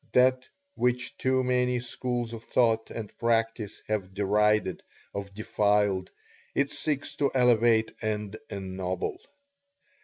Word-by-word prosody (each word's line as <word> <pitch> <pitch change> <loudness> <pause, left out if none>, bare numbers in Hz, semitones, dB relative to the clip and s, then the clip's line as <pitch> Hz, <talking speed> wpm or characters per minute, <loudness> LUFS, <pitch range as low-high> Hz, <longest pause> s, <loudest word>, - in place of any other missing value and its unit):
That 130 0 +4 0.3
which 125 - 0
too 130 0 +2
many 125 0 +2
schools 120 -1 -3
of 115 -1 -7
thought 115 -2 +2
and 110 -3 -7
practice 115 -2 0
have 95 -3 -2
derided 105 -1 +2 0.3
or 100 0 -3
defiled, 105 -2 +1 0.5
it 140 0 +2
seeks 145 -2 -1
to 140 -2 +2
elevate 120 -3 +4
and 105 -2 -2
ennoble. 95 -2 -3
115 Hz, 115 wpm, -28 LUFS, 105-125 Hz, 0.5 s, That